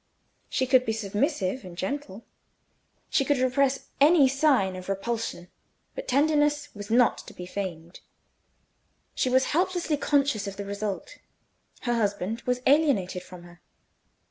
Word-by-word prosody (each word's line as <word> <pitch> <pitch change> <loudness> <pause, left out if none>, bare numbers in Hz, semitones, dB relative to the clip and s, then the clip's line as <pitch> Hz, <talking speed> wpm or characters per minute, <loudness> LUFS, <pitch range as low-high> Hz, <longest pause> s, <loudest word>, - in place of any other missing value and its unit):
She 260 - 0
could 255 -1 +4
be 220 - -1
submissive 220 - -1
and 180 -2 -10
gentle, 230 +1 -5 0.9
she 275 - +3
could 285 +1 +1
repress 260 +1 +1
any 295 0 +6
sign 265 -9 +2
of 185 +1 -8
repulsion; 195 -3 -3 0.4
but - - -7
tenderness 295 +1 +2
was 205 -2 -9
not 240 +1 +3
to - - -12
be 180 - -7
feigned. 180 -3 -6 1.1
She 255 - 0
was 260 +1 +2
helplessly 350 -2 +1
conscious 280 -8 +1
of 195 -1 -6
the 200 - -5
result: 200 0 -5 0.6
her 240 - 0
husband 210 0 -1
was 250 0 0
alienated 265 - +2
from 180 -1 -12
her. 175 0 -16
240 Hz, 140 wpm, -26 LUFS, 195-280 Hz, 1.1 s, any